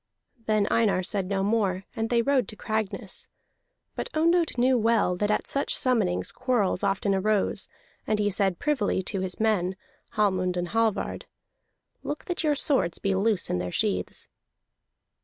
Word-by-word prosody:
Then 215 -2 +2
Einar 210 -5 +2
said 195 0 -1
no 195 0 0
more, 200 -3 +1
and 225 0 -2
they 235 -1 +2
rode 275 0 +2
to 215 - -8
Cragness. 220 -1 -3 0.7
But - - -4
Ondott 335 -1 +2
knew 255 +2 +4
well 225 -5 +2
that 205 +3 -1
at 210 - +1
such 280 - -1
summonings 220 -9 +1
quarrels 245 -8 0
often 200 0 +1
arose; 205 +1 +1 0.4
and 215 - +1
he 205 0 +1
said 195 -2 +1
privily 250 -10 0
to 195 +1 -3
his 185 -1 -4
men, 195 -4 +1 0.4
Hallmund 185 -4 +1
and 175 0 -2
Hallvard: 225 -1 -1 0.7
"Look 295 - -5
that 355 -1 -3
your 300 -2 +2
swords 255 - +2
be 195 - 0
loose 200 0 +1
in 90 - 0
their 90 0 -3
sheaths." - - -2
210 Hz, 160 wpm, -26 LUFS, 190-235 Hz, 0.7 s, knew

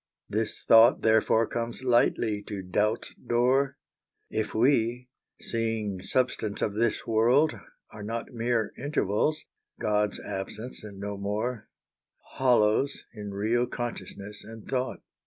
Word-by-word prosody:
This 110 +1 -2
thought 115 +1 +6
therefore 110 +1 +4
comes 120 +3 -3
lightly 120 -3 +2
to 100 -3 -5
Doubt's 105 +5 0
door— 130 +3 +1 0.5
If 110 0 -2
we, 125 0 +2 0.3
seeing 110 -4 -2
substance 110 -2 0
of 105 - 0
this 115 +1 0
world, 120 +7 +4 0.4
are 105 - -10
not 115 +2 -4
Mere 115 -2 0
Intervals, 140 +1 0 0.3
God's 105 -1 0
Absence 110 +6 -6
and 100 -2 -9
no 100 0 -4
more, 105 +3 -3 0.6
Hollows 125 +1 +2
in 105 -1 -7
real 110 +5 0
Consciousness 105 -4 -6
and 110 -1 -11
Thought. 130 -1 -2
115 Hz, 120 wpm, -28 LUFS, 105-120 Hz, 0.6 s, thought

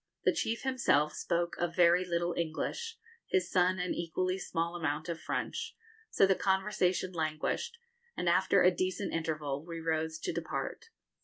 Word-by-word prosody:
The - - +4
chief 230 +1 -1
himself 195 - +2
spoke 170 0 -1
a 175 - +2
very 175 +1 +4
little 175 -1 0
English, 450 - -3 0.3
his 185 -1 +1
son 185 0 +3
an 180 -1 -1
equally 185 +2 -1
small 170 -1 -2
amount 155 -2 -2
of 165 -1 -4
French; - - -3 0.3
so - - +5
the 190 - +4
conversation 190 -1 +1
languished, 160 - -2 0.4
and 180 - -2
after 185 +2 +4
a 180 - +7
decent 185 +2 -1
interval 150 -3 -2
we 165 0 -6
rose 160 0 -1
to - - -2
depart. 470 - -4
175 Hz, 155 wpm, -32 LUFS, 165-190 Hz, 0.4 s, a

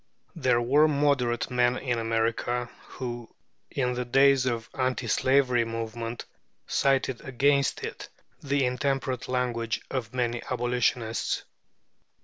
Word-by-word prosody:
There 130 -7 +2
were 145 +6 +5
moderate 140 -5 +1
men 125 0 +2
in 120 -3 -1
America, 115 +2 -1 0.2
who, 120 -2 -6 0.4
in 125 -2 -1
the 125 0 -2
days 135 +1 +4
of 115 -2 -2
the - - -15
anti 130 -1 0
slavery 130 0 +3
movement, 115 +1 -5 0.4
cited 130 -2 +1
against 140 +2 +1
it - - -6 0.3
the 140 -1 +1
intemperate 130 0 -1
language 120 -3 -1
of 120 -5 -3
many 120 -1 0
abolitionists. 120 -2 0
125 Hz, 120 wpm, -27 LUFS, 120-135 Hz, 0.4 s, were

